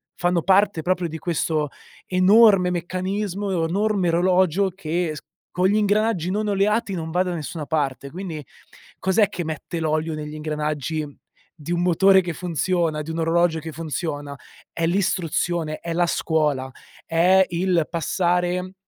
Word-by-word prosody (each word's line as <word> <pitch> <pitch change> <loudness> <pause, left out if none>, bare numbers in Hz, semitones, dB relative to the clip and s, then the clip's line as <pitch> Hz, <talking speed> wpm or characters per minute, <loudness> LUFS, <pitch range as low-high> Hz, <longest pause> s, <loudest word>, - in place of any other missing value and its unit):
fanno 175 -2 0
parte 195 -2 +3
proprio 180 0 0
di 160 0 -6
questo 160 -3 -1 0.4
enorme 190 0 +5
meccanismo 185 +3 -3
e 165 -3 0
enorme 200 0 +1
orologio 185 +2 +2
che 175 -2 -2
s - - -7 0.3
con 180 +1 +2
gli 200 - +2
ingranaggi 210 -3 +1
non 210 +3 -1
oleati 205 +1 +1
non 165 -3 -4
va 180 +2 +2
da 180 -1 -3
nessuna 155 -1 -5
parte. 140 -3 -2
Quindi, 170 -4 -6 0.6
cos'è 195 +3 +3
che 180 - -4
mette 160 +2 -5
l'olio 155 0 -1
negli 150 0 -6
ingranaggi 150 0 -3 0.5
di 160 +1 -7
un 175 0 0
motore 190 +2 +5
che 175 -2 -4
funziona, 170 -1 -1
di 155 - -9
un 165 - -4
orologio 165 0 +2
che 160 +1 -7
funziona: 145 -2 -4 0.4
è 165 - -1
l'istruzione, 175 -3 0
è 170 - -4
la 175 +1 +2
scuola, 150 -6 0 0.4
è 180 +3 +4
il 175 -2 +1
passare, 180 +2 0
175 Hz, 150 wpm, -23 LUFS, 160-185 Hz, 0.6 s, enorme